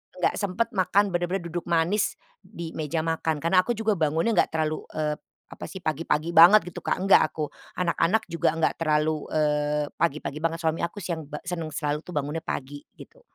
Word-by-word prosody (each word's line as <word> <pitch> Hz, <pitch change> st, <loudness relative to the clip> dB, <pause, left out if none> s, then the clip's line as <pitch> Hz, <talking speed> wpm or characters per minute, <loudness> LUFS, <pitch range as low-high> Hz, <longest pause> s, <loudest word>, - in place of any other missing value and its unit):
enggak 180 Hz, -, +1 dB
sempet 200 Hz, +3 st, 0 dB
makan, 195 Hz, +1 st, +2 dB
bener-bener 175 Hz, +1 st, -1 dB
duduk 175 Hz, 0 st, -4 dB
manis 170 Hz, +5 st, +1 dB, 0.2 s
di 165 Hz, -1 st, -8 dB
meja 155 Hz, +1 st, -2 dB
makan. 160 Hz, -2 st, -1 dB
Kan 165 Hz, -, 0 dB
aku 235 Hz, +6 st, +1 dB
juga 220 Hz, 0 st, +1 dB
bangunnya 160 Hz, +8 st, +1 dB
enggak 200 Hz, -, +3 dB
terlalu, 155 Hz, -1 st, -1 dB
eee, 150 Hz, -1 st, 0 dB, 0.3 s
apa -, -, -9 dB
sih, -, -, -8 dB
pagi-pagi 155 Hz, +1 st, -1 dB
banget, 180 Hz, +6 st, +8 dB
gitu, -, -, -7 dB
Kak, -, -, 0 dB
enggak 195 Hz, +2 st, +5 dB
aku. 155 Hz, -2 st, -4 dB, 0.3 s
Anak-anak 180 Hz, +4 st, +1 dB
juga 170 Hz, -2 st, +2 dB
enggak 165 Hz, -1 st, 0 dB
terlalu, 155 Hz, -1 st, +1 dB
eee, 150 Hz, -1 st, +1 dB
pagi-pagi 150 Hz, -2 st, -1 dB
banget, 165 Hz, 0 st, 0 dB
suami 160 Hz, 0 st, 0 dB
aku 170 Hz, +4 st, -3 dB
si 180 Hz, -, -3 dB
yang 160 Hz, -3 st, -6 dB
ba 150 Hz, -, -5 dB
senang 170 Hz, -3 st, -3 dB
selalu 150 Hz, 0 st, -2 dB
tuh 180 Hz, -, -11 dB
bangunnya 150 Hz, +3 st, -2 dB
pagi, 145 Hz, -1 st, -5 dB, 0.2 s
gitu. -, -, -15 dB
165 Hz, 190 wpm, -26 LUFS, 150-180 Hz, 0.3 s, banget